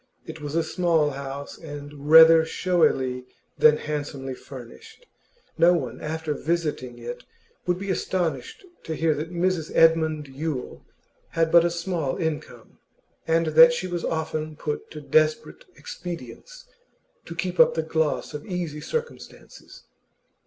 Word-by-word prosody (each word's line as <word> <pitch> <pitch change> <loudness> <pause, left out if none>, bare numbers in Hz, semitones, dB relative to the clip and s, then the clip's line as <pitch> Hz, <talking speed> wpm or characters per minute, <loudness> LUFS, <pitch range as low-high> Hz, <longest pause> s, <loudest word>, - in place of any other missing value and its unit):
It 160 -1 -9
was 145 +1 -5
a 165 - +2
small 160 -3 +1
house, 140 +1 -7
and 145 -2 -9
rather 160 0 +9
showily 135 -7 0 0.3
than 150 0 +6
handsomely 145 -3 -5
furnished; 130 - -12 0.5
no 175 +1 +6
one 140 -8 -3
after 160 0 -3
visiting 150 -6 -2
it 120 +1 -7 0.4
would 180 0 +1
be 195 +1 -3
astonished 170 - -3 0.2
to 160 - -3
hear 160 0 +2
that 155 +3 -5
Mrs 175 -2 -1
Edmund 160 -2 +3
Yule 135 -1 -5 0.5
had 165 -1 +2
but 170 -1 +7
a 175 - +2
small 170 -4 -2
income, 160 -4 -5 0.5
and 165 0 +2
that 245 +4 +8
she 240 - -3
was 175 -2 -4
often 155 -1 -3
put 150 0 -5
to 150 - -9
desperate 155 - +1
expedients 175 - -9 0.6
to 170 - -8
keep 180 +1 -3
up - - +6
the 160 - 0
gloss 160 -1 -1
of 150 - -6
easy 175 -6 -4
circumstances. 470 - -7
160 Hz, 140 wpm, -24 LUFS, 145-170 Hz, 0.6 s, rather